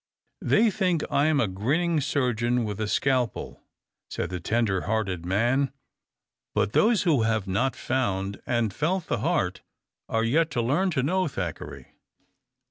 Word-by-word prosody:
"They 220 0 +3
think 185 -6 0
I 145 +2 +3
am 155 -2 +2
a 115 - +2
grinning 150 - 0
surgeon 125 -4 0
with 105 -1 -4
a 105 - -1
scalpel," 125 -1 -1 0.5
said - - -4
the 90 - -3
tender 105 0 0
hearted 95 -6 -1
man. 120 +8 +1 0.8
But 105 - +1
those 220 -1 +3
who 155 -9 +3
have 110 -2 +1
not 115 +8 0
found 100 -6 -2
and 120 -4 0
felt 170 +4 -1
the - - -1
heart - - 0 0.5
are 115 0 +1
yet 155 +8 +2
to - - +3
learn 160 +11 +1
to 145 -7 0
know 185 +5 +1
Thackeray. 90 - -6
125 Hz, 150 wpm, -26 LUFS, 105-155 Hz, 0.8 s, They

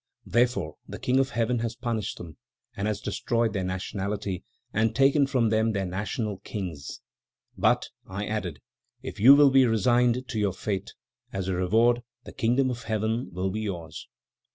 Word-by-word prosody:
"Therefore, 120 -10 +1
the - - -7
King 130 +1 +1
of 135 0 +2
Heaven 115 +1 0
has 115 0 -2
punished 115 -4 -3
them, 80 -3 -10 0.4
and 100 +1 -2
has 105 -1 -2
destroyed 115 -1 0
their 95 -3 -1
nationality 95 +1 -3 0.3
and 110 +1 +1
taken 140 +1 +4
from 125 -5 +2
them 110 +1 +2
their 100 -2 -1
national 100 +2 -3
kings, 90 -9 -6 0.5
'but,' - - +2 0.2
I 100 +2 -4
added, 100 -8 -3 0.4
'if - - -7
you 130 +7 +9
will 145 -1 +6
be 130 -1 +6
resigned 120 +3 +2
to 110 - -2
your 100 -3 +1
fate, 95 0 -4 0.4
as 95 -1 -3
a 95 - 0
reward 115 +7 +3 0.2
the - - -11
Kingdom 125 +3 +2
of 125 0 -5
Heaven 110 +3 -1
will 95 +2 -2
be 110 +3 -3
yours.'" 85 -6 -5
110 Hz, 170 wpm, -27 LUFS, 95-120 Hz, 0.5 s, you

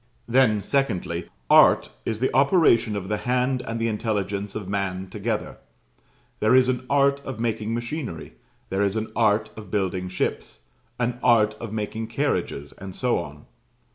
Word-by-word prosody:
Then, 115 -4 +3
secondly, 95 -10 -1 0.2
ART - - +6
is 110 -1 -2
the 130 - 0
operation 135 - +4
of 95 -2 -4
the 105 +1 -1
hand 125 +3 0
and 115 -2 -4
the 115 - 0
intelligence 105 -2 -2
of 100 -4 -5
man 95 -1 -2
together; 105 +1 -3 0.8
there 110 +4 +4
is 130 -1 +5
an 130 0 -1
art 140 0 +3
of 130 -5 -6
making 115 -1 -1
machinery; 120 - -5 0.4
there 95 +1 -1
is 100 0 +1
an 110 0 -3
art 105 -1 +2
of 110 -1 -10
building 95 -3 -1
ships; 60 -8 -3 0.4
an 125 0 -1
art 110 -3 +4
of 115 -2 -6
making 110 +1 -3
carriages; 115 - -2
and 95 -1 -9
so 125 -2 +1
on. 75 -3 -9
110 Hz, 160 wpm, -24 LUFS, 100-125 Hz, 0.8 s, ART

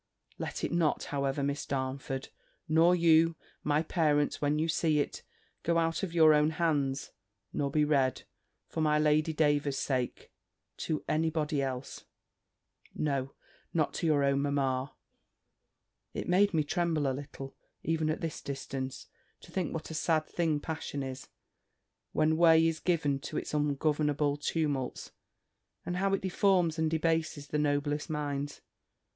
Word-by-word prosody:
Let - - -4
it - - -1
not, 170 -3 +1
however, 140 0 0
Miss 140 +1 -1
Darnford 135 0 -3 0.4
nor 165 +3 +5
you, 165 -1 +4 0.3
my 150 +1 +2
dear - - -24
parents 150 -4 +2
when 145 +1 +1
you 160 +2 +1
see 155 -1 +2
it 145 - -2 0.4
go 170 0 +1
out 165 0 +1
of 195 -4 -3
your 160 -2 +6
own 150 0 +4
hands, 140 -5 0 0.4
nor 140 - 0
be 150 +1 +2
read, 135 -3 +1 0.4
for 160 - -4
my 150 -1 +3
Lady 155 +1 +3
Davers's 145 -3 +1
sake, 130 -2 -2 0.5
to 155 -2 -2
any 160 +1 +1
body 150 -2 -1
else 130 -1 -4 0.9
No, 140 -3 -1 0.4
not 155 -3 +1
to 170 - -1
your 145 -3 +3
own 140 0 +2
mamma. 135 -1 -1 1.2
It - - -3
made 200 +3 +4
me 160 -4 +2
tremble 165 -1 0
a 135 - +1
little, 135 0 -8 0.3
even 160 -1 0
at 155 - -2
this 165 -3 -4
distance, 135 -1 -5 0.4
to - - -14
think 185 -4 -1
what 160 0 -5
a - - -5
sad 155 0 +1
thing 160 -3 0
passion 145 -2 -4
is, 130 0 -6 0.8
when 155 +1 +2
way 165 -1 +6
is 165 -1 0
given 150 -6 +1
to - - -6
its - - -4
ungovernable 150 0 +1
tumults, 145 -4 -2 0.7
and 180 - -2
how 195 +1 +1
it - - -5
deforms 180 -3 +2
and 160 0 +2
debases 160 -2 0
the 150 - 0
noblest 145 0 0
minds. 145 -1 -3
150 Hz, 150 wpm, -31 LUFS, 140-160 Hz, 1.2 s, your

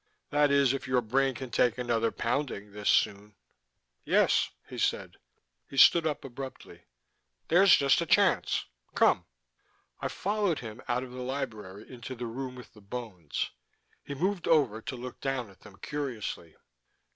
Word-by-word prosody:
That 145 0 +4
is, 140 -2 +4
if 135 - -4
your 130 -1 +2
brain 135 +3 +1
can 130 0 -7
take 120 0 +2
another 115 -2 0
pounding 115 -8 -2
this 105 0 -2
soon." 105 0 +1 0.7
"Yes," - - +3 0.2
he - - -7
said. - - -1 0.5
He 135 - -9
stood 165 +4 +7
up 150 -3 -3
abruptly. 135 +1 -9 0.6
"There's 185 +3 +7
just 140 +3 +3
a 170 - -2
chance. - - +3 0.3
Come!" - - +4 0.7
I - - -2
followed 200 -4 0
him 115 +1 -8
out 125 0 0
of 130 - -9
the 125 0 -7
library 110 -7 -5
into 125 0 -8
the 120 0 -5
room 125 +2 -5
with 125 - -12
the 105 - -16
bones. 100 -7 -5 0.5
He 140 - -6
moved 185 +5 -1
over 130 -9 +3
to 140 +2 -5
look 125 0 -8
down 130 -6 -2
at 95 - -21
them 100 -3 -15
curiously. 125 - -5
125 Hz, 155 wpm, -29 LUFS, 110-140 Hz, 0.7 s, stood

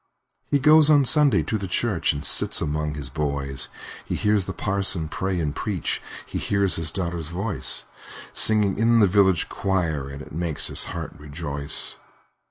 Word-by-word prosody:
He 145 - +3
goes 150 +2 +5
on 145 -3 +5
Sunday 150 0 +4
to 110 - -2
the 100 - -5
church, 100 -1 0
And 70 -1 -5
sits - - +4
among 75 0 -2
his 70 -3 -4
boys; 70 -1 -3 0.4
He - - -4
hears 105 -2 +1
the 95 - -4
parson 95 -3 0
pray 95 +1 -2
and 75 -3 -2
preach, 100 -7 -3 0.2
He - - -5
hears 100 -2 +1
his 80 -1 0
daughter's 85 -4 -2
voice, 95 +5 -1 0.5
Singing 105 -3 +2
in 115 +1 +4
the 105 - +6
village 95 -2 +3
choir, 85 -8 -2
And 70 +2 -8
it - - -14
makes 80 -1 -3
his - - +4
heart - - -6
rejoice. 70 -1 -2
90 Hz, 170 wpm, -23 LUFS, 75-105 Hz, 0.5 s, the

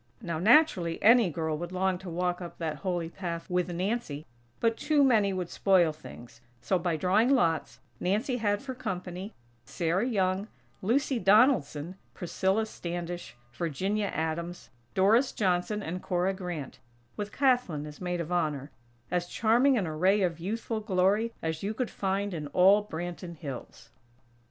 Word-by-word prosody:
Now, 170 -2 -4
naturally, 195 - +4
any 230 -2 +6
girl 160 -1 -2
would 175 +1 -5
long 185 0 0
to 190 -1 -8
walk 180 +1 -1
up 175 - -8
that 160 -2 -3
Holy 175 -3 -2
path 170 -2 -5
with 180 0 0
Nancy, 180 -4 -2 0.3
but 230 0 +2
too 295 +3 +2
many 220 -7 +4
would 180 -2 -3
spoil 180 -5 +3
things; 120 -6 -13 0.2
so, 185 +7 0
by 170 -2 -1
drawing 200 +8 +3
lots, 165 - +1 0.2
Nancy 215 +8 0
had 205 -2 0
for 265 -2 -5
company, 185 -3 -5 0.3
Sarah 175 - -1
Young, 195 -3 0 0.3
Lucy 250 +5 +1
Donaldson, 190 - +3 0.2
Priscilla 190 +4 0
Standish, 175 - -6 0.2
Virginia 190 - -1
Adams, 170 +1 -4 0.2
Doris 220 +8 +4
Johnson 195 +1 0
and 180 +2 -4
Cora 180 +1 0
Grant; 175 -9 -6 0.4
with 205 0 -4
Kathlyn 245 - +1
as 150 +2 -10
Maid 180 -1 -2
of 170 +1 -6
Honor, 150 -5 -1 0.4
as 175 -1 0
charming 240 +7 +3
an 200 - 0
array 185 +6 +2
of 170 -2 -1
youthful 220 +5 -3
glory 205 +2 +1
as 160 -1 -2
you 210 +2 -3
could 250 0 -2
find 195 0 -1
in 155 -3 -4
all 190 +7 +5
Branton 175 -2 -6
Hills. 140 -6 -8
185 Hz, 150 wpm, -29 LUFS, 170-210 Hz, 0.4 s, any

